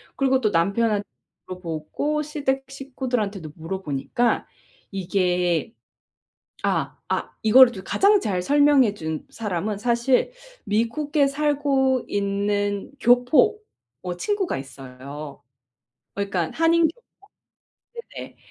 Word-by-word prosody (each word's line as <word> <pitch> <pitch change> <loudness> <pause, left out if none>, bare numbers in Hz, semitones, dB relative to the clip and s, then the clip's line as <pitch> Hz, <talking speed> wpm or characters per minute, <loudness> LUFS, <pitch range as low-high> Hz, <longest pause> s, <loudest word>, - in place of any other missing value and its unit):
그리고 265 -1 +2
또 215 -3 +1
남편 200 +6 +2
한 205 -1 0 0.4
물어보고 180 - -3
시댁 280 -3 -2
식구들한테도 245 - -4
물어보니까 185 - -2 0.4
이게 180 -1 0 0.9
아 - - 0 0.2
아 - - -1
이걸 245 +3 +7
주 190 -5 -8
가장 400 - +4
잘 185 - -1
설명해 285 -2 +4
준 160 -5 -5
사람은 205 -1 -3
사실 235 - +2 0.3
미국에 255 +8 +1
살고 275 -3 +1
있는 205 +1 -1
교포 250 - +4 0.4
어 180 -1 -3
친구가 405 - -1
있어요. 135 +2 -9 0.7
그니까 195 -5 -2
한인 330 +1 +3
교포 340 +10 -10 1.2
네네. - - -8
220 Hz, 220 characters per minute, -23 LUFS, 185-275 Hz, 1.2 s, 이걸